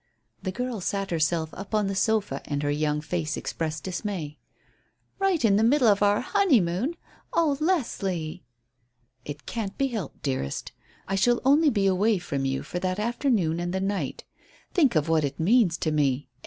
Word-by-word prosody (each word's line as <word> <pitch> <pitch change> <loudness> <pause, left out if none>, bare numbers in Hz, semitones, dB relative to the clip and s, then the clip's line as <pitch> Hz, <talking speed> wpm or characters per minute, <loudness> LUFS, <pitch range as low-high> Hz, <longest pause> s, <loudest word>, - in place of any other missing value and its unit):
The 185 - -3
girl 245 0 -3
sat 195 +1 -2
herself 160 -1 0
up 195 +3 -5
on 210 -1 +2
the 195 - -1
sofa, 195 -7 0
and 145 0 -2
her 145 - +1
young 150 0 0
face 155 -1 -2
expressed 155 -1 -3
dismay. 180 -6 -4 0.8
"Right 380 -9 +2
in 200 -2 +4
the 215 - +3
middle 255 +2 +4
of 205 -1 +4
our 205 0 +3
honeymoon. 250 - +2 0.4
Oh, 315 -4 +3
Leslie!" 195 - -1 0.8
"It 145 0 -7
can't 210 -4 -4
be 275 0 +1
helped, 215 - -6
dearest. 130 - -2 0.4
I 195 - -3
shall 240 +5 +3
only 295 +3 +5
be 205 -6 +1
away 195 +3 +3
from 140 -6 -3
you 135 0 -1
for 175 - -4
that 185 0 -1
afternoon 210 - 0
and 175 +1 -2
the - - 0
night. 195 +1 -2 0.5
Think 290 - +3
of 155 0 +2
what 160 -1 +2
it 140 -1 -3
means 185 -1 +3
to 160 - -1
me. 140 -2 +1
190 Hz, 175 wpm, -26 LUFS, 155-230 Hz, 0.8 s, only